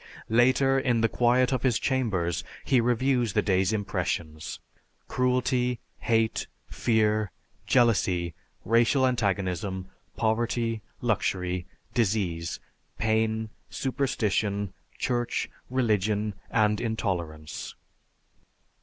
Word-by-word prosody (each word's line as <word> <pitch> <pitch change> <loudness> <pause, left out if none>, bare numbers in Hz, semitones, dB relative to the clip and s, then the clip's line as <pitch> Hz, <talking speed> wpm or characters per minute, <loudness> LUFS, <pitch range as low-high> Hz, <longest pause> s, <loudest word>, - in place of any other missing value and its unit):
Later, 130 +3 +4
in 120 -3 +1
the 115 - +4
quiet 125 +3 +3
of 130 - 0
his 125 -4 +2
chambers, 100 - 0 0.2
he 130 -3 +4
reviews 125 -1 +2
the - - +2
day's 95 0 +2
impressions 85 -7 -2 0.5
cruelty, 125 -1 +1 0.2
hate, 115 -1 +1 0.2
fear, 110 -2 +1 0.4
jealousy, 95 -8 +3 0.3
racial 115 +5 +4
antagonism, 95 -5 -1 0.3
poverty, 115 0 0 0.2
luxury, 90 -5 0 0.3
disease, 90 -7 0 0.4
pain, 110 0 +1 0.2
superstition, 105 -7 -1 0.2
church, 120 -1 -1 0.2
religion, 105 -4 +1 0.2
and 105 -3 +2
intolerance. 85 -9 -3
110 Hz, 85 wpm, -27 LUFS, 95-125 Hz, 0.5 s, Later